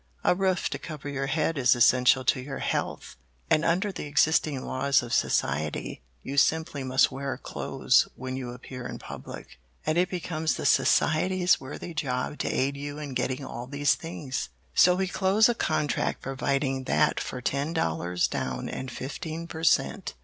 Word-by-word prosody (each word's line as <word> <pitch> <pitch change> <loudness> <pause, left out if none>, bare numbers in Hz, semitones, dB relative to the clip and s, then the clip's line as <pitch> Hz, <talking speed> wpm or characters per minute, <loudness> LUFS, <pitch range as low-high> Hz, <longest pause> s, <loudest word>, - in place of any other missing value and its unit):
A - - +4
roof 190 0 +1
to - - -3
cover 150 -3 -7
your 135 -1 -2
head 145 +2 0
is 125 -1 +5
essential 125 +2 +4
to 130 - +2
your 135 +1 -6
health, - - -3 0.3
and 155 - +4
under 185 +5 +1
the 155 - -6
existing 150 -2 +2
laws 135 0 +2
of 120 - -5
society 75 -3 0 0.2
you 140 - -5
simply 155 -1 +2
must 130 0 +3
wear 135 0 -4
clothes - - +1
when 130 0 -5
you 130 -2 -5
appear 125 +1 -8
in - - -6
public, - - -10 0.3
and 155 +2 +2
it 180 +1 +2
becomes 160 -3 -2
the - - -5
Society's 180 +3 +3
worthy 145 +5 -7
job 135 -2 -2
to - - -1
aid 140 +2 0
you 145 +1 -6
in 145 -3 -6
getting 130 +2 -2
all 120 -1 -6
these 145 +1 +2
things. 150 -6 -5 0.2
"So 180 0 +6
we 190 +1 0
close 195 +4 +3
a 240 - +2
contract 150 -9 -1
providing 135 0 -1
that - - +2
for 125 - -5
ten 140 +5 -1
dollars 90 - 0
down - - -3
and 130 - -5
fifteen 160 +6 -5
per 160 -1 -7
cent. 190 +3 +1
140 Hz, 170 wpm, -27 LUFS, 130-160 Hz, 0.3 s, So